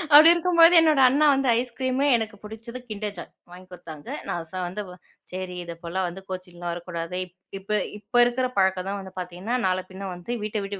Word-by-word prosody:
அப்டி 310 Hz, +3 st, +10 dB
இருக்கும்பொழுது 340 Hz, 0 st, +5 dB
என்னோட 310 Hz, -3 st, +4 dB
அண்ணா 290 Hz, +4 st, +3 dB
வந்து 270 Hz, -1 st, 0 dB
ஐஸ் 250 Hz, -1 st, -2 dB
கிரீமு 260 Hz, +1 st, 0 dB
எனக்கு 220 Hz, -2 st, -4 dB
புடிச்சது 225 Hz, +3 st, -8 dB
kinder 210 Hz, 0 st, -3 dB
joy 175 Hz, -, -6 dB, 0.3 s
வாங்கி 180 Hz, +1 st, -12 dB
குட்தாங்க, 155 Hz, -4 st, -10 dB, 0.2 s
நான் 170 Hz, -1 st, -3 dB
சா 185 Hz, -, -4 dB
வந்து, 190 Hz, +4 st, -5 dB, 0.5 s
"சரி 185 Hz, 0 st, -5 dB
இதைப்போல 170 Hz, +2 st, -5 dB
வந்து 185 Hz, +3 st, -7 dB
கோச்சின்லாம் 180 Hz, -2 st, -6 dB
வரக்கூடாது, 170 Hz, 0 st, -5 dB
இப் 180 Hz, 0 st, -23 dB, 0.2 s
இப்ப 195 Hz, -, -22 dB, 0.3 s
இப்ப 230 Hz, -, -12 dB
இருக்கிற 255 Hz, +1 st, 0 dB
பழக்கம் 190 Hz, -1 st, +2 dB
தான் 200 Hz, 0 st, -3 dB
வந்து 190 Hz, -1 st, -10 dB
பாத்தீங்கன்னா, 180 Hz, +6 st, -4 dB
நாள 185 Hz, 0 st, +1 dB
பின்ன 190 Hz, +1 st, -6 dB
வந்து 175 Hz, +7 st, -8 dB
வீட்டை 210 Hz, -1 st, -2 dB
விட்டு 200 Hz, 0 st, -6 dB
195 Hz, 190 wpm, -25 LUFS, 180-245 Hz, 0.5 s, அப்டி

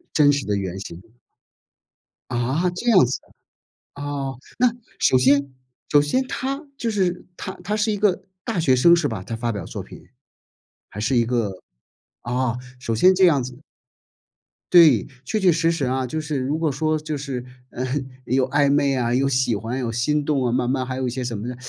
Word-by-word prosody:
真 145 Hz, -2 st, +6 dB
实 140 Hz, -1 st, -1 dB
的 105 Hz, -, 0 dB
原 95 Hz, -1 st, -3 dB
型。 90 Hz, -2 st, -8 dB, 1.3 s
啊？ 130 Hz, +9 st, 0 dB
这 240 Hz, +7 st, -5 dB
样 190 Hz, -, +6 dB
子。 125 Hz, -, -2 dB, 0.8 s
哦， 140 Hz, -2 st, -4 dB, 0.2 s
那 245 Hz, -1 st, +4 dB, 0.3 s
首 130 Hz, -, +4 dB
先 140 Hz, +2 st, +3 dB, 0.4 s
首 145 Hz, -, +6 dB
先 255 Hz, -, 0 dB
她 275 Hz, +1 st, -3 dB, 0.2 s
就 230 Hz, -2 st, -1 dB
是 185 Hz, -4 st, -1 dB
她 -, -, -5 dB
她 210 Hz, +3 st, -1 dB
是 215 Hz, 0 st, +1 dB
一 -, -, -1 dB
个 195 Hz, -2 st, +1 dB, 0.2 s
大 225 Hz, -5 st, -2 dB
学 135 Hz, -5 st, +4 dB
生， 170 Hz, +7 st, +6 dB
是 165 Hz, -4 st, 0 dB
吧？ 110 Hz, -7 st, -5 dB
她 115 Hz, +4 st, -5 dB
发 115 Hz, +1 st, -2 dB
表 105 Hz, -, -5 dB
作 -, -, -6 dB
品， -, -, -14 dB, 0.8 s
还 105 Hz, -, -11 dB
是 125 Hz, +4 st, +1 dB
一 120 Hz, -, +4 dB
个 115 Hz, -5 st, 0 dB, 0.7 s
啊， 125 Hz, 0 st, -1 dB, 0.2 s
首 115 Hz, -3 st, -2 dB
先 185 Hz, +12 st, +5 dB
这 185 Hz, 0 st, +5 dB
样 145 Hz, -6 st, +3 dB
子。 125 Hz, +3 st, -9 dB, 1.1 s
对， 155 Hz, -, +7 dB, 0.2 s
确 215 Hz, -, -1 dB
确 190 Hz, -3 st, +4 dB
实 165 Hz, +1 st, +2 dB
实 165 Hz, -5 st, -1 dB
啊。 130 Hz, +1 st, -1 dB
就 155 Hz, +5 st, -3 dB
是 150 Hz, -2 st, -3 dB
如 135 Hz, +4 st, -1 dB
果 160 Hz, -2 st, 0 dB
说 155 Hz, +3 st, 0 dB
就 155 Hz, -1 st, -4 dB
是， 135 Hz, -3 st, -5 dB, 0.3 s
呃， 125 Hz, -, -4 dB, 0.4 s
有 130 Hz, +1 st, +1 dB
暧 145 Hz, +1 st, +3 dB
昧 140 Hz, -1 st, +2 dB
啊， 120 Hz, -2 st, 0 dB
有 135 Hz, +2 st, +2 dB
喜 130 Hz, -3 st, +1 dB
欢 115 Hz, +5 st, -4 dB
有 120 Hz, -3 st, -2 dB
心 145 Hz, +6 st, 0 dB
动 140 Hz, -4 st, +1 dB
啊， 120 Hz, -, +1 dB
慢 125 Hz, 0 st, 0 dB
慢 130 Hz, 0 st, 0 dB
还 130 Hz, 0 st, -4 dB
有 130 Hz, -1 st, -1 dB
一 -, -, 0 dB
些 125 Hz, +1 st, -4 dB
什 120 Hz, -3 st, -3 dB
么 110 Hz, -, -5 dB
呢， 125 Hz, -, -4 dB
135 Hz, 215 characters per minute, -22 LUFS, 125-160 Hz, 1.3 s, 对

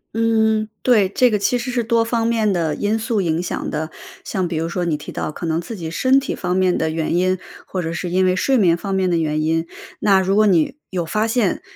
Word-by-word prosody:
嗯， 220 Hz, -1 st, +2 dB
对， 220 Hz, -6 st, +4 dB
这 250 Hz, +6 st, +3 dB
个 210 Hz, -2 st, 0 dB
其 245 Hz, +5 st, +1 dB
实 245 Hz, +1 st, -4 dB
是 240 Hz, -2 st, -1 dB
多 230 Hz, -1 st, +2 dB
方 230 Hz, 0 st, 0 dB
面 225 Hz, -3 st, +1 dB
的 165 Hz, -5 st, 0 dB
因 215 Hz, +2 st, 0 dB
素 220 Hz, -2 st, 0 dB
影 165 Hz, -1 st, 0 dB
响 180 Hz, -, -4 dB
的。 155 Hz, +1 st, -3 dB, 0.4 s
像 190 Hz, -4 st, -1 dB
比 165 Hz, -2 st, -3 dB
如 165 Hz, -, -1 dB
说 175 Hz, +1 st, -2 dB
你 160 Hz, -3 st, 0 dB
提 145 Hz, -, -10 dB
到， -, -, -3 dB
可 170 Hz, -, -7 dB
能 165 Hz, +1 st, 0 dB
自 220 Hz, +6 st, -7 dB
己 165 Hz, -3 st, -5 dB
身 260 Hz, +11 st, +3 dB
体 -, -, -4 dB
方 180 Hz, 0 st, -2 dB
面 185 Hz, -1 st, +2 dB
的 160 Hz, -, 0 dB
原 160 Hz, +1 st, -1 dB
因， 185 Hz, +1 st, +1 dB, 0.3 s
或 185 Hz, -, -3 dB
者 165 Hz, -1 st, -3 dB
是 175 Hz, +1 st, -4 dB
因 185 Hz, +1 st, +2 dB
为 185 Hz, 0 st, +2 dB
睡 265 Hz, +7 st, +2 dB
眠 175 Hz, -6 st, +4 dB
方 195 Hz, +3 st, -4 dB
面 190 Hz, -1 st, +1 dB
的 170 Hz, -, +1 dB
原 155 Hz, -1 st, 0 dB
因， 165 Hz, +1 st, 0 dB, 0.3 s
那 195 Hz, -2 st, +4 dB
如 190 Hz, +1 st, +1 dB
果 215 Hz, 0 st, +5 dB
你 180 Hz, -, +2 dB
有 180 Hz, -3 st, -2 dB
发 210 Hz, +7 st, 0 dB
现， 225 Hz, -4 st, 0 dB
185 Hz, 270 characters per minute, -20 LUFS, 170-220 Hz, 0.4 s, 果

